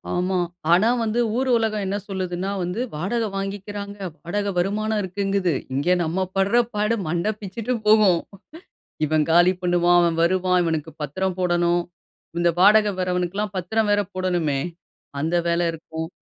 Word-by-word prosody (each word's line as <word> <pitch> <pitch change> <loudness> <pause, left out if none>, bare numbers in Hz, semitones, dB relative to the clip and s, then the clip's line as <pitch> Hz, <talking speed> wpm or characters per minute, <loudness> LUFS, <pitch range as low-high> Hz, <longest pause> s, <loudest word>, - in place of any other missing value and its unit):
ஆமா. 180 +1 0 0.3
ஆனா 190 +6 +5
வந்து, 225 +1 0 0.2
ஊர் 260 0 0
உலகம் 215 -2 -1
என்ன 200 +2 -1
சொல்லுதுனா 185 -1 -3
வந்து, 180 +6 -3
வாடகை 215 +8 -1
வாங்கிக்கிறாங்க. 200 +1 -5 0.2
வாடகை 200 +4 -2
வருமானம் 210 +4 0
இருக்குங்குது. 195 -1 0 0.2
இங்க, 140 +5 -1 0.2
நம்ம 175 +4 -1
படுற 200 +5 +3 0.2
பாடு, 210 +2 +1
மண்ட 170 +4 -1
பிச்சுட்டு 220 +5 -4
போகும். 210 -5 +5 0.9
இவன் 155 0 +1
காலி 175 +2 +6
பண்ணுவான். 175 0 +3
அவன் 170 -1 +1
வருவான். 180 +1 +2
இவனுக்கு 160 -1 -2
பத்திரம் 185 +6 -2
போடணும். 175 -1 +2 0.6
இந்த 175 0 +3
வாடகை 210 +2 +6
வர்றவனுக்குலாம் 180 +3 -1
பத்திரம் 210 +4 0
வேற 205 0 +3
போடணுமே. 175 -7 0 0.6
அந்த 160 +4 0
வேல 170 +1 +1
இருக்கும். 160 0 -6
185 Hz, 135 wpm, -23 LUFS, 175-205 Hz, 0.9 s, காலி